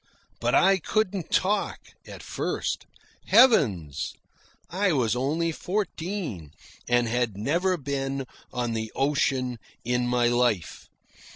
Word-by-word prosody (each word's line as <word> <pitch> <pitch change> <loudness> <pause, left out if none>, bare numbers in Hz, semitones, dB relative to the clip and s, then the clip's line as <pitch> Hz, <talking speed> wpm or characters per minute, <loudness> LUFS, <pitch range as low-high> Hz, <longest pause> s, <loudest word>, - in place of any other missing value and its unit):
But - - +1
I 195 0 +5
couldn't 195 0 -1
talk 200 +1 +1 0.3
at - - -10
first. - - -3 0.4
Heavens! 95 - +4 0.5
I 190 0 +1
was 120 -5 +1
only 155 +7 0
fourteen, 175 - -4 0.4
and 120 -1 +3
had 115 -3 -1
never 175 - +1
been 135 -1 -3 0.3
on 120 -2 -2
the 110 -1 -3
ocean 135 -3 0 0.3
in 125 0 +1
my 120 -1 +2
life. 120 - 0
135 Hz, 110 wpm, -26 LUFS, 120-180 Hz, 0.5 s, I